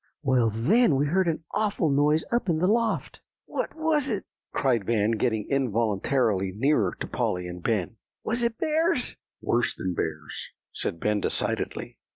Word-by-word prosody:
Well, 130 -5 +3
then 155 - +3
we 140 +2 +2
heard 180 +5 +2
an 165 0 -1
awful 205 -6 +1
noise 150 +3 +3
up 235 -4 +1
in 165 - +2
the 170 - +1
loft." 225 +3 0 0.2
"What - - -3
was 315 -3 +1
it?" 205 -4 -2 0.3
cried 125 -6 +1
Van, 110 +1 +1
getting 110 -1 0
involuntarily 115 -4 +1
nearer 120 -7 +2
to - - -1
Polly 90 0 -1
and 90 0 -7
Ben. 110 +1 -1 0.3
"Was 240 +2 -1
it 235 -1 0
bears?" 315 -2 +1 0.3
"Worse 120 +1 +1
than 90 -1 -3
bears," 75 -3 -3 0.2
said 85 - -3
Ben 105 +1 +1
decidedly. - - -2
135 Hz, 160 wpm, -26 LUFS, -, 0.3 s, Well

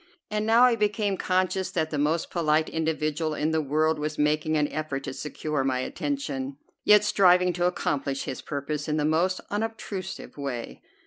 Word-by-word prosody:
And 210 0 -1
now 230 +2 +6
I 250 -2 +6
became 210 -2 0
conscious 185 0 0
that 160 -2 -1
the 150 - -1
most 155 +3 0
polite 155 -2 +2
individual 155 -1 -1
in 155 +2 0
the 160 0 +1
world 155 +2 +1
was 150 +1 -3
making 150 +1 +1
an 150 -1 +2
effort 150 -3 -3
to - - -5
secure 150 0 -3
my 130 -1 0
attention, 140 - -3 0.3
yet 210 0 +6
striving 180 -3 +4
to 175 +1 0
accomplish 140 -6 -1
his - - -5
purpose 145 +1 -4
in 155 0 0
the 150 - +1
most 170 +4 +1
unobtrusive 205 -5 -4
way. 135 -5 -5
155 Hz, 175 wpm, -26 LUFS, 150-185 Hz, 0.3 s, now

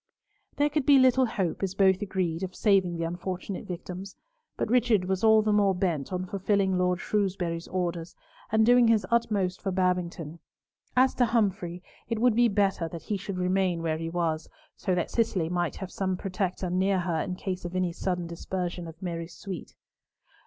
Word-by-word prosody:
There 290 +1 +2
could 295 -2 -1
be 285 -1 +8
little 260 0 +5
hope, 190 -6 -2
as 195 -1 -2
both 190 0 +4
agreed, 185 -4 -1
of 190 -1 -4
saving 190 -5 +2
the 165 - -2
unfortunate 180 +3 -4
victims; 180 +2 -7 0.4
but - - -1
Richard 235 -5 +3
was 190 +1 -1
all 220 -1 +6
the 215 -1 +2
more 200 -2 +3
bent 170 -6 -1
on 185 0 -2
fulfilling 195 0 +1
Lord 180 0 +1
Shrewsbury's 180 -5 -1
orders, 175 -1 -3 0.4
and 220 0 +4
doing 245 0 +6
his 225 -2 +3
utmost 205 -5 +1
for 195 - -2
Babington. 180 -3 -1 0.6
As 260 +1 +5
to 245 - +3
Humfrey, 195 -6 0 0.3
it 230 - -1
would 240 +1 +4
be 240 +1 +5
better 195 -5 +1
that 165 -2 -8
he 210 - -2
should 195 -1 -5
remain 180 -2 +1
where 160 -1 -1
he 165 0 -3
was, 165 -2 -1 0.3
so 185 -3 -1
that 175 - -1
Cicely 195 -8 +1
might 175 -1 -1
have 190 -2 -7
some 190 -1 -1
protector 185 -1 -2
near 190 +1 +2
her 170 -3 -1
in 180 - -3
case 185 0 -4
of 175 +1 -6
any 185 -1 +1
sudden 180 -1 -2
dispersion 175 +1 -4
of 165 0 -11
Mary's 170 -1 -5
suite. 190 -5 -7
185 Hz, 185 wpm, -28 LUFS, 175-205 Hz, 0.6 s, be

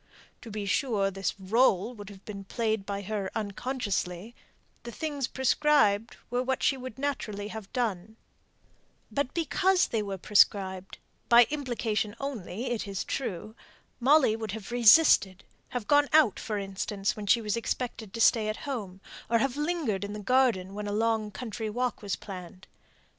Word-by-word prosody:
To 230 - -10
be 210 -1 -4
sure, 200 -2 +1
this 195 -2 -2
rÖle 210 +2 +2
would 205 -2 -9
have 200 -1 -14
been 200 -2 -7
played 220 0 -2
by 200 0 -3
her 200 -1 -3
unconsciously; 210 -3 -3 0.5
the 240 - -8
things 285 +1 -3
prescribed 265 -6 +2
were 245 +1 +1
what 260 0 -1
she 275 - +3
would 255 -3 -8
naturally 215 -7 -3
have 220 -2 -8
done; 220 -4 -2 0.9
but 280 -2 -1
because 365 +3 +2
they 225 - 0
were 200 -2 -4
prescribed 190 -1 +2 0.3
by 235 0 +9
implication 230 -7 -2
only, 245 -4 -4
it 225 -3 -2
is 195 -2 -3
true 215 -3 -4 0.4
Molly 260 -3 +4
would 220 -3 -5
have 220 0 -7
resisted; 230 - +5 0.3
have 245 -4 -4
gone 290 0 +4
out, 305 -9 +5
for 215 - -3
instance, 195 0 -2
when 210 -2 -7
she 235 - +5
was 210 -1 -2
expected 230 -2 -3
to 230 - -4
stay 220 -1 +4
at 215 - -3
home; 205 -9 -5 0.3
or 230 - +4
have 250 +2 0
lingered 295 - -1
in 200 0 -5
the 210 - -6
garden 210 -5 +2
when 210 0 -5
a - - -2
long 220 0 0
country 225 0 -5
walk 245 +2 -2
was 200 -3 -2
planned. 185 -1 -10
220 Hz, 165 wpm, -28 LUFS, 200-250 Hz, 0.9 s, by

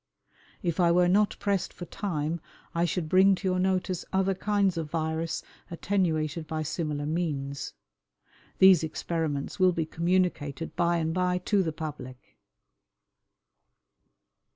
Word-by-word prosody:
If 170 -1 -1
I 170 -1 +5
were 175 +1 +4
not 205 +3 +3
pressed 200 -2 -1
for 175 - -8
time 170 -4 -3 0.3
I 170 0 +1
should 175 -1 -2
bring 190 +3 +5
to 190 - -4
your 185 0 +1
notice 185 -1 0
other 190 0 +2
kinds 200 -1 +1
of 160 -2 -3
virus 160 0 -2 0.3
attenuated 165 -4 -1
by 155 -1 -2
similar 150 -2 -3
means. 145 -4 -3 0.8
These 190 -4 +7
experiments 160 -1 -3
will 185 -1 +5
be 165 -1 -1
communicated 165 -3 -1
by 170 -1 +2
and 160 -1 -1
by 180 0 +1
to 195 +2 +1
the 165 -3 -1
public." 150 -5 -8
170 Hz, 130 wpm, -28 LUFS, 155-185 Hz, 0.8 s, These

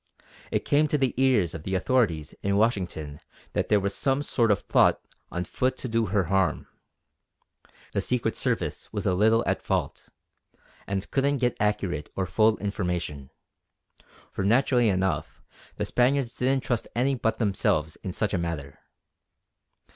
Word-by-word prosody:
It - - -1
came 150 +2 +3
to 150 - +1
the 135 -3 +1
ears 125 -9 +2
of 80 - -6
the 95 +4 -3
authorities 90 - +1
in 100 0 +1
Washington 90 -9 -1 0.3
that - - -1
there 105 - +4
was 100 0 -2
some 135 +4 0
sort 115 -5 +1
of 105 - +1
plot - - +4 0.3
on 90 - -2
foot 130 +8 -1
to 130 - -5
do 115 -1 0
her 100 +1 +2
a - - -7
harm. 95 -4 +1 1.3
The - - +1
Secret 125 -2 0
Service - - -2
was - - -3
a - - +2
little 110 +5 +3
at - - 0
fault, - - -2 0.8
and 100 0 -3
couldn't 140 +1 +2
get 125 -2 0
accurate 95 -7 -1
or 95 - 0
full 110 +2 +3
information; 90 -9 -3 1.0
for - - -3
naturally 120 +2 +3
enough 95 -1 -1 0.4
the - - -2
Spaniards 125 0 +1
didn't 130 +1 0
trust 120 -3 -1
any 130 +3 +2
but 115 -3 -1
themselves 85 -7 0
in 95 - -6
such 105 +3 -1
a 95 - +1
matter. 80 -5 -5
105 Hz, 160 wpm, -26 LUFS, 90-125 Hz, 1.3 s, there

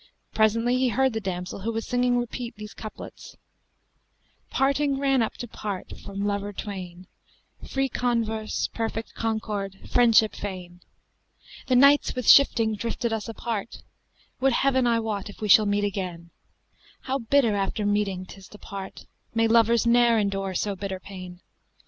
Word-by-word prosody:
Presently, 230 +3 +2
he 260 - +2
heard 265 +2 +1
the 220 - -2
damsel 180 -1 -4
who 220 +4 -2
was 225 0 -3
singing 245 0 +1
repeat 240 0 -4
these 210 0 -9
couplets, 215 - -10 1.1
'Parting 275 +1 +1
ran 270 -2 +2
up 225 - -1
to 240 - -6
part 205 -4 -6
from 200 0 -4
lover 205 0 -2
twain 185 -3 -7 0.3
* - - -18
Free 270 0 0
converse, 230 -4 -1
perfect 225 0 -4
concord, 210 -3 -3
friendship 230 -3 +4
fain: 180 -3 -7 0.9
The 255 - +2
Nights 280 +3 +5
with 250 -2 -4
shifting 230 -5 +6
drifted 230 +2 -2
us 225 +1 -3
apart, 225 -1 -5 0.3
* - - -36
Would 270 -1 +3
heaven 260 -1 +2
I 230 -1 +3
wot 215 -2 -3
if - - -12
we 215 - -3
shall 210 +1 +6
meet 205 0 +1
again: 180 -4 -4 0.7
How 270 +1 -2
bitter 230 -2 +2
after 200 +1 -1
meeting 205 -3 0
'tis 190 0 -13
to 210 - -14
part, 195 -2 -8
* - - -39
May 225 0 +3
lovers 230 0 +4
ne'er 235 0 +4
endure 195 -2 -1
so 200 +2 -1
bitter 190 -1 -5
pain! 185 -2 -10
220 Hz, 160 wpm, -25 LUFS, 200-240 Hz, 1.1 s, shifting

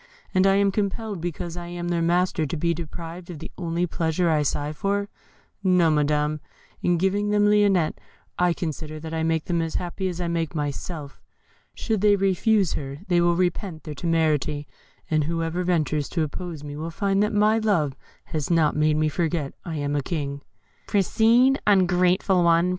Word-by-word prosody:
And 190 0 +4
am 200 +1 +4
I - - -1
compelled, 205 -1 -2
because 170 0 -4
I 175 -1 -6
am 175 0 -4
their 170 -1 0
master, 170 -2 +1
to 165 - -3
be 170 +2 +1
deprived 170 +2 -7
of 175 - -6
the - - -9
only 170 0 -1
pleasure 165 0 0
I 155 -1 +2
sigh 145 +1 -1
for? 200 +4 -1 0.5
No, 180 -4 +4
Madam; 150 0 +1 0.4
in 175 -1 +2
giving 200 +4 +1
them 210 0 +3
Lionette 205 -5 +3 0.4
I 180 0 +2
consider 155 -2 -5
that 160 +1 -7
I 160 - -1
make 160 -1 0
them 170 -2 0
as 165 -1 -3
happy 180 +2 -2
as 180 -1 -4
I 175 - -1
make 165 -1 -2
myself. 145 0 -5 0.5
Should 220 -4 -1
they 205 -1 +5
refuse 195 0 +2
to - - -2
receive 135 0 -7
her, 190 - -17
they 175 -1 +4
will 175 0 +3
repent 175 -1 -1
their 155 - -6
temerity; 155 -3 0 0.4
and 155 -2 +2
whoever 165 +2 -1
ventures 155 -4 0
to 165 - 0
oppose 155 0 -6
me 145 0 -7
will 160 +2 -4
find 195 +4 0
that 210 - +1
my 215 +1 +3
love 170 -11 +1 0.3
has 155 -3 -4
not 165 -3 +3
made 150 0 +2
me 155 0 +2
forget 160 -2 -1
I 165 -2 -4
am 145 -1 -2
a 145 - +1
king." 140 -1 -4 0.5
"Proceed, 230 +6 +3
ungrateful 185 -1 +3
one! 170 +1 +4
170 Hz, 185 wpm, -24 LUFS, 155-190 Hz, 0.5 s, they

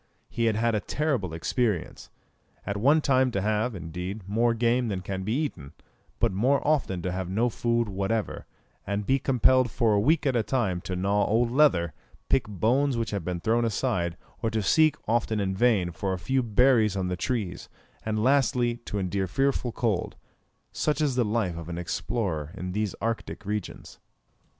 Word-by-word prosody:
He 115 - 0
had 110 -2 +2
had 115 +1 +1
a 105 - +1
terrible 130 - -1
experience. 90 +3 -2 0.6
At 100 - -2
one 140 +9 +4
time 130 -2 +3
to 100 - 0
have, 110 +3 0
indeed, 90 +3 -6
more 115 +3 +2
game 120 +1 +1
than 95 -4 -2
can 95 0 -4
be 105 +4 -2
eaten; 105 - -3 0.5
but - - +2
more 125 +9 +2
often 125 - +1
to 90 - -1
have 90 0 -3
no 115 +6 +1
food 115 0 0
whatever, 100 +2 -2 0.4
and 100 +1 -2
be 135 +4 +2
compelled 130 -1 +3
for 115 -1 +1
a 100 - +3
week 150 +8 +2
at 135 -3 +2
a 120 - +3
time 105 -6 -1
to 90 - -4
gnaw 100 +3 +1
old 115 +2 +2
leather, 105 - +3 0.4
pick 135 -5 +2
bones 120 +7 +1
which 115 -1 -2
had 100 -4 -3
been 90 0 -3
thrown 115 +6 +2
aside, 100 -7 -1 0.2
or 115 - +1
to 110 -1 -1
seek, 155 +7 +4
often 115 -1 +1
in 95 -1 -1
vain, 100 -5 +2
for 95 +3 -2
a - - -2
few 130 +8 0
berries 115 -3 +3
on 95 -1 -1
the 90 - -1
trees; 95 -4 -3 0.3
and 110 0 -1
lastly, 125 -3 +2
to 105 - -4
endure 95 0 -1
fearful 135 +4 0
cold 110 -6 -1 0.6
such 150 0 -1
is 150 -3 +1
the 125 0 +2
life 105 -5 -1
of 85 0 -7
an 85 - -4
explorer 85 -2 -2
in 90 0 -4
these 105 0 -2
Arctic 115 -1 -3
regions. 105 -1 -5
110 Hz, 185 wpm, -27 LUFS, 95-125 Hz, 0.6 s, one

